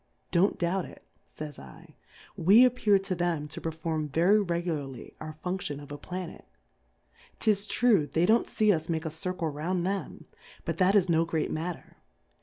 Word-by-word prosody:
Don't 185 +3 +3
doubt 180 +1 0
it, - - -13 0.2
fays 150 -2 -8
7, 65 -3 -13 0.4
we 210 +9 +7
appear 225 -5 +3
to 195 0 -3
them 170 -4 -1
to 145 - -7
perform 160 -1 -3
very 175 +8 +4
re 175 -3 -1
gularly 145 -7 -5
our 155 0 -6
Function 180 -6 -3
of 145 0 -11
a 145 - -5
Planet: 180 +1 -7 0.9
'Tis 210 -2 +1
true, 205 -9 +3
they 165 +3 +1
don't 220 +4 +3
fee 215 -1 +3
us 160 -1 -3
make 160 -1 -1
a 160 - -2
Circle 170 +1 -3
round 170 +5 -2
them, 195 +1 -3 0.4
but - - -3
that 190 +2 +4
is 190 -3 +4
no 165 -1 +3
great 165 -2 -2
mat 165 +2 -2
ter. - - -21
170 Hz, 180 wpm, -28 LUFS, 155-195 Hz, 0.9 s, we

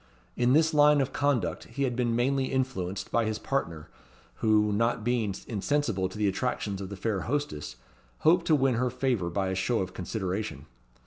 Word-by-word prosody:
In 125 +1 +3
this 160 +2 +4
line 150 0 +6
of 135 -1 -1
conduct 140 -8 0
he 140 - -4
had 125 -3 0
been 120 -2 0
mainly 135 +3 +1
influenced 100 -9 -2
by 115 - +2
his 110 0 -1
partner, 85 - -3 0.5
who, 105 -1 +3
not 115 +1 +1
being 115 -4 0
insensible 105 -4 -1
to 95 - -10
the 105 -1 +1
attractions 100 -1 -2
of 95 - -6
the 100 - -7
fair 105 0 -1
hostess, 140 - -3 0.5
hoped 170 +2 +4
to 155 - +5
win 135 -2 +2
her 125 - +1
favour 120 -8 -1
by 95 +2 -1
a - - -1
show 105 +6 0
of 95 -2 -2
consideration. 95 -5 -4
115 Hz, 185 wpm, -28 LUFS, 95-135 Hz, 0.5 s, line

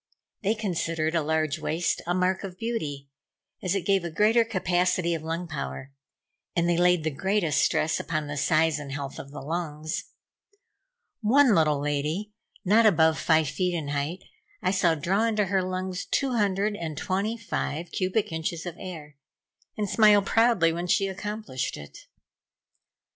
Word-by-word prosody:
They 215 +1 +1
considered 165 -6 -1
a 165 - +2
large 155 0 0
waist 160 +2 -1
a 175 - +1
mark 185 +1 +1
of 185 -2 -7
beauty, 150 -13 -4 0.5
as 185 +1 0
it 190 -4 -2
gave 195 -2 +2
a 170 - -3
greater 215 +8 +4
capacity 180 -4 +1
of 165 - -3
lung 165 +2 -3
power; 140 -3 -5 0.6
and 170 -1 +2
they 175 - +2
laid 175 -1 +3
the 155 - 0
greatest 165 -1 +1
stress 155 - +1
upon 155 -2 -2
the 145 0 -5
size 155 +2 +2
and 140 -2 -7
health 140 -1 -5
of 140 - -8
the 145 - -8
lungs. 155 0 -3 1.2
One 250 +3 +5
little 155 -5 +3
lady, 150 +8 -2 0.3
not 220 +4 +5
above 160 -5 +4
five 160 -2 +3
feet 180 +1 -1
in 155 -4 -3
height, 145 +6 -3 0.4
I - - 0
saw 180 -4 +3
draw 190 +8 +1
into 215 -2 +1
her 190 0 +1
lungs 185 0 -3
two 275 -2 0
hundred 205 -2 +1
and 160 -5 -5
twenty 200 +7 -1
five 175 -6 -4
cubic 190 +2 0
inches 160 +1 -3
of 175 -1 -6
air, 155 -6 -8 0.6
and 210 -1 -1
smile 210 0 +5
proudly 225 -7 +3
when 175 +2 -3
she 195 +3 +3
accomplished 200 - -4
it. 75 -1 -12
175 Hz, 165 wpm, -26 LUFS, 155-195 Hz, 1.2 s, One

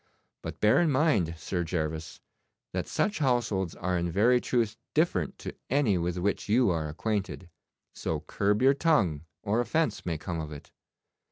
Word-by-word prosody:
But - - -7
bear 105 +8 +5
in 170 - +3
mind, 130 - +2
Sir 90 +2 -2
Gervas, 80 -2 -3 0.5
that - - -2
such 210 +1 0
households 115 - 0
are 90 0 -1
in 85 0 -1
very 120 +7 +4
truth 115 -3 0 0.2
different 150 - +1
to - - -7 0.2
any 135 -7 +3
with 85 +1 -2
which 100 +3 -1
you 120 -1 +4
are 80 -2 -1
acquainted, 95 +1 -3 0.4
so 80 -2 -3
curb 100 +8 0
your 135 +1 +6
tongue 105 - +1 0.2
or 110 +3 +1
offence 160 +6 0
may 85 -3 -2
come 85 +2 -4
of 80 -1 -5
it. 75 - -10
100 Hz, 165 wpm, -28 LUFS, 85-125 Hz, 0.5 s, your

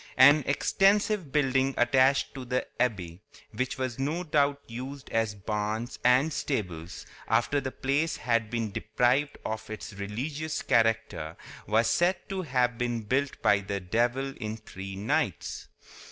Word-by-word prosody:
An 145 +3 +8
extensive 195 +3 +2
building 135 -2 +2
attached 130 +3 +3
to 135 -2 -6
the 125 +1 -1 0.2
abbey—which 105 +3 -3
was 130 -1 -3
no 155 +6 -1
doubt 145 -3 +2
used 130 +4 -7
as 110 -2 0
barns 105 +3 -3
and 130 +6 +4
stables 90 - -3 0.2
after 145 -1 +2
the 130 - -3
place 140 +6 0
had 115 -2 0
been 115 -2 -2
deprived 125 +8 +1
of 110 0 -4
its 110 0 -7
religious 135 +11 -4
character—was 115 -1 0
said 175 +7 +3
to 195 -2 -2
have 125 -6 0
been 120 -1 -1
built 135 +6 -1
by 105 -2 +5
the 100 0 -3
devil 120 +8 0
in 110 -1 -4
three 95 -3 -8
nights. 100 +3 -2
125 Hz, 135 wpm, -28 LUFS, 110-140 Hz, 0.2 s, An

